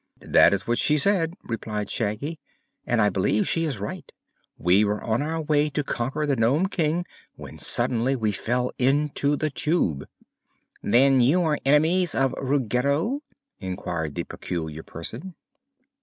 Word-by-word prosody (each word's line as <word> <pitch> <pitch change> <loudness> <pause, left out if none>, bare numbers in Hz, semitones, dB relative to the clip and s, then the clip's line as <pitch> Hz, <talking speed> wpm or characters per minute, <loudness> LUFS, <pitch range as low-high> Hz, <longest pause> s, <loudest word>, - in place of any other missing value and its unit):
"That - - +5
is 100 0 -1
what 120 0 0
she 150 - +2
said," 170 0 +2
replied 105 -3 -4
Shaggy, 120 +9 -3 0.5
"and 120 - +1
I 105 -1 +4
believe 100 +2 0
she 165 0 +1
is 140 -7 -3
right. 105 - -6 0.5
We 90 +4 +3
were 105 0 -1
on 115 +3 0
our 160 +2 -2
way 150 0 +2
to 150 +1 -2
conquer 135 +4 -2
the 140 -2 +1
Nome 135 +11 +2
King 170 -1 0 0.3
when - - -11
suddenly 125 +3 +2
we 110 -4 0
fell 125 +5 -1
into 145 +2 +1
the 155 +1 -2
Tube." 135 - -1 0.8
"Then 130 +4 +4
you 155 +9 +3
are 155 -3 0
enemies 160 +5 +3
of 135 0 +1
Ruggedo?" 140 - 0 0.4
inquired 85 -5 -4
the - - -2
peculiar 80 -2 -6
Person. 115 - -8
135 Hz, 150 wpm, -24 LUFS, 105-150 Hz, 0.8 s, That